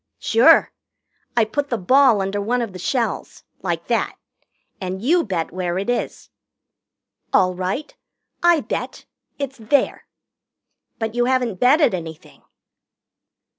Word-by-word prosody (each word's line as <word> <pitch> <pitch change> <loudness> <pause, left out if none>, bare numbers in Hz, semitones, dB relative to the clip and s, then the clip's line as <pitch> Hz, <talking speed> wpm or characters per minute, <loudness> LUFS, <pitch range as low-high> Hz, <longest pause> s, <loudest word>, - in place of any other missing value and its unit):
"Sure. 455 - +5 0.7
I 230 - +5
put 285 +6 -3
the 235 - 0
ball 230 +1 +4
under 200 +1 -2
one 240 +4 0
of 215 -5 -6
the 185 - -8
shells 240 +5 -2 0.2
like - - -3
that - - -1 0.7
and 185 0 -4
you 330 - +2
bet 180 -6 -3
where 180 -1 -2
it 200 +5 -1
is." 245 - -4 1.0
"All 185 0 +3
right. 185 +11 -4 0.5
I 345 -3 +4
bet. - - -5 0.3
It's 275 -3 -5
there." 255 +5 0 0.9
"But 225 -1 -3
you 240 0 +1
haven't 250 -6 0
betted 285 - +4
anything." 160 -3 -8
230 Hz, 130 wpm, -21 LUFS, 185-265 Hz, 1.0 s, Sure